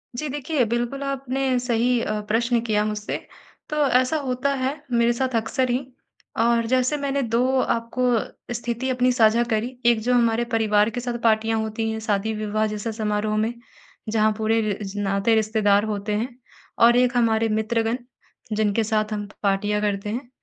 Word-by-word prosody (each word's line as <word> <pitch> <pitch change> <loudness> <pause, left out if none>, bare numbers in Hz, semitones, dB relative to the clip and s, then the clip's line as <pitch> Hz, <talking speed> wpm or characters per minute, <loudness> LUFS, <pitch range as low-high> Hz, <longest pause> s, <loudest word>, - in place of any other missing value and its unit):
जी, 300 +5 -3
देखिए, 290 0 0
बिल्कुल 240 +4 -2
आपने 270 -1 -1
सही 245 0 +1
अ, 215 -1 -2
प्रश्न 235 +2 +1
किया 210 -2 +1
मुझसे 210 0 -3 0.5
तो 300 -1 +1
ऐसा 255 +5 +2
होता 255 +3 0
है 265 +1 -1 0.2
मेरे 235 0 +3
साथ 255 0 -2
अक्सर 255 +3 0
ही। 255 +2 -1 0.5
और 235 0 +3
जैसे 255 +3 +1
मैंने 280 -1 -1
2 250 +3 +1
आपको 240 0 -1
स्थिति 240 +2 -3
अपनी 250 0 +2
साझा 230 0 +4
करी 230 +3 -1
एक 235 -2 +5
जो 250 +3 +1
हमारे 235 -1 +3
परिवार 210 -1 +3
के 245 +2 -4
साथ 240 -1 -3
पार्टियाँ 225 0 +2
होती 220 +1 -2
हैं 220 - -3
शादी-विवाह 215 0 -1
जैसा 210 +2 -4
समारोह 215 -1 -1
में 220 +2 0 0.6
जहाँ 215 0 +3
पूरे 220 +1 +1
र 210 -2 -1 0.2
नाते 200 +3 +2
रिश्तेदार 215 -2 +2
होते 210 0 -3
हैं 230 +5 -1 0.6
और 240 +1 +6
एक 250 0 +2
हमारे 225 -1 +2
मित्रगण 225 +2 0 0.6
जिनके 215 +1 +1
साथ 215 0 0
हम 205 -1 -4 0.2
पार्टियाँ 205 +1 +1
करते 205 0 -1
हैं। 240 +2 -5
230 Hz, 165 wpm, -23 LUFS, 215-250 Hz, 0.6 s, और